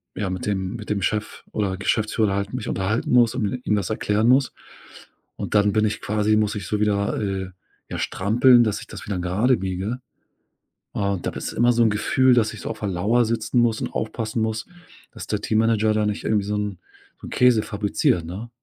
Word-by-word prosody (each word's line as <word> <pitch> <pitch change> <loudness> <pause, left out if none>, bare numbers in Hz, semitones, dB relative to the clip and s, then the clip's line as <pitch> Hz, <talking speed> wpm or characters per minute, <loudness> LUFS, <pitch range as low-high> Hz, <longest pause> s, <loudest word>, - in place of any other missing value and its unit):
ja, 100 -3 -2
mit 95 -1 -4
dem 95 -2 -2
mit 110 -3 -8
dem 100 -1 0
Chef 105 +3 -2
oder 100 -3 -1
Geschäftsführer 105 0 0
halt 100 +2 -3
mich 125 - -4
unterhalten 100 +4 -1
muss 120 -1 +5
und 105 -6 -1
ih 125 - -5
ihm 105 - +1
das 100 -3 -2
erklären 110 0 0
muss. 130 +1 +4 0.8
Und - - -5
dann 105 -1 +4
bin 110 0 +2
ich 105 - -2
quasi 105 +1 +1
muss 105 -1 +1
ich 100 -4 -5
so 105 - -1
wieder, 100 -1 +1
äh, 95 -2 -3 0.4
ja - - -5
strampeln, 120 +5 +4
dass 110 -3 -1
ich - - -11
das - - -10
wieder 100 -3 -2
gerade 100 +9 +2
biege. 95 +5 -3 0.9
Und 100 -3 -2
da - - +1
bist - - -5
immer 120 +1 +3
so 120 - +2
'n 115 - +4
Gefühl, 130 +5 +3
dass 110 -2 +1
ich - - -9
so - - -5
auf 110 - -6
der 105 - -2
Lauer 105 +7 +2
sitzen 115 +2 -1
muss 115 -2 +1
und - - -4
aufpassen 110 0 -3
muss, 110 0 -2 0.5
dass - - -8
der - - -2
Teammanager 110 -1 +2
da 105 0 +1
nicht 105 -1 -3
irgendwie 105 -2 +1
so' 105 - -2
n 105 -3 -3 0.4
so - - -9
'n - - -8
Käse 125 -4 +4
fabriziert, 100 -5 0
ne? 100 +8 -7
105 Hz, 215 wpm, -23 LUFS, 100-115 Hz, 0.9 s, muss